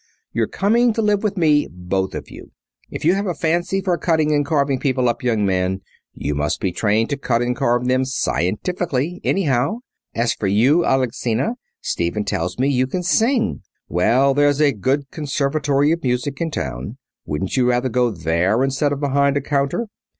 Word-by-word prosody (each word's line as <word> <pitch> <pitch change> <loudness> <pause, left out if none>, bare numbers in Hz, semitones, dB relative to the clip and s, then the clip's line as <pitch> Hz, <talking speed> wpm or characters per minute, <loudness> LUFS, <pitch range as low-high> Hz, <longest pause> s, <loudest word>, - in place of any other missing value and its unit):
You're - - +1
coming 230 +4 +2
to 225 - -1
live 205 -1 +2
with 210 -2 -2
me, 150 -4 +3
both 90 +1 -3
of - - -7
you. - - -11 0.4
If - - -6
you 170 - +5
have 200 +1 -1
a 175 - -2
fancy 175 +4 0
for 180 -3 0
cutting 155 -3 +2
and 145 0 +2
carving 140 -2 0
people 130 -3 +1
up, 120 - -1
young 115 -4 +1
man, 95 0 0 0.3
you 75 - -3
must 75 +2 -1
be 95 - -1
trained 110 +5 +1
to 140 - 0
cut 120 -3 0
and 125 0 -1
carve 120 +1 +1
them 130 +1 +2
scientifically, 140 - -1
anyhow. 150 - +1 0.3
As 115 +1 +1
for 100 - -3
you, 125 - +3
Alexina, 130 - 0 0.3
Stephen 85 +5 -1
tells 90 -2 -2
me 130 +2 +1
you 130 -2 +1
can 180 +7 -3
sing. 230 +6 +1 0.3
Well, 125 +10 +3
there's 145 0 +3
a 150 -2 +4
good 135 +5 -1
Conservatory 145 0 0
of 170 +1 0
Music 130 +2 -2
in 165 - 0
town. 65 - -5 0.3
Wouldn't 75 +6 -2
you 125 -2 +3
rather 125 +1 +1
go 125 +1 +2
there 90 +5 +1
instead 135 +2 0
of 145 - -2
behind 140 0 +2
a - - 0
counter?" 140 +10 -1
135 Hz, 185 wpm, -20 LUFS, 115-155 Hz, 0.4 s, you